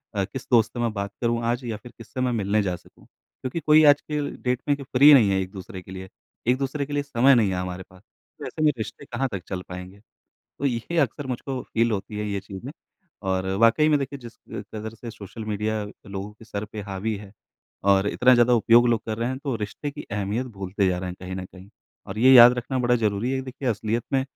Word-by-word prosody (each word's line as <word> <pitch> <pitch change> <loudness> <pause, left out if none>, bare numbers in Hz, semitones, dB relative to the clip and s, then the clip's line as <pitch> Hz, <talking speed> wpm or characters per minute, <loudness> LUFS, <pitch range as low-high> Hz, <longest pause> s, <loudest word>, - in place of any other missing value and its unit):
अ, 100 - +1
किस 130 +6 -8
दोस्त 115 -3 +4
से 120 - -5
मैं 120 -1 +1
बात 100 -1 -3
करूँ 120 -1 +1
आज 120 +2 0
या 115 -3 -3
फिर 120 +3 -13
किससे 120 +2 -7
मैं 125 -1 +1
मिलने 105 -2 +1
जा 90 -2 -1
सकूँ?" - - -19
क्योंकि 130 +6 -8
कोई 155 0 +5
आज 145 - 0
के 150 -1 -3 0.2
डेट 125 0 -1
में 145 - +3
कि 140 - -8
फ्री 140 +3 +7
नहीं 115 -8 +6
है 95 - +2
एक-दूसरे 95 +1 -7
के 90 - -13
लिए, 95 0 -8 0.4
एक-दूसरे 135 +3 0
के 145 - -7
लिए 145 0 0
समय 135 -1 +4
नहीं 110 -5 +3
है 95 - -1
हमारे 90 0 -4
पास। 95 0 -18 0.4
तो - - -5
ऐसे - - -6
में 150 - +5
रिश्ते 115 +5 -6
कहाँ 135 +1 -2
तक 95 -3 -4
चल 95 -2 -4
पाएँगे? 90 +2 -8 0.6
तो 140 - -2
ये 130 +6 -1
अक्सर 140 0 -1
मुझको 130 +1 -4
फ़ील 115 +1 0
होती 105 +1 -4
है 105 - -2
ये 100 -1 -1
चीज़ें 95 +7 -8 0.6
और 95 0 0 0.2
वाक़ई 115 +7 +5
में, 150 - +4
देखिए, 140 0 -4
जिस 120 -2 -12
क 105 - -6
कदर 110 +1 -5
से 115 +1 -8
सोशल 110 0 -9
मीडिया 105 0 -1 0.2
लोगों 100 0 -6
के 110 +2 -16
सर 105 -1 -4
पे 105 0 -7
हावी 100 +2 -3
है 100 -1 -11 0.5
और 100 0 +4
इतना 125 +4 +4
ज़्यादा 120 0 +5
उपयोग 120 +1 +5
लोग 115 -2 +2
कर 110 -1 -3
रहे 115 +2 -1
हैं, 130 - -3
तो 140 -3 -2
रिश्ते 110 +7 -5
की 145 +1 -9
अहमियत 105 +5 -1
भूलते 95 +1 0
जा 90 -1 +1
रहे 90 0 -4
हैं 90 - -7
कहीं 95 0 -5
न 95 -1 -5
कहीं 95 +1 -15 0.4
और 95 - -6
ये 130 +3 +7
याद 120 -1 +10
रखना 130 +2 -2
बड़ा 125 0 +3
ज़रूरी 110 +1 0
है - - 0
कि - - -2
देखिए, 130 0 -3
असलियत 110 +1 -1
में 135 - +3
115 Hz, 245 wpm, -24 LUFS, 100-130 Hz, 0.6 s, याद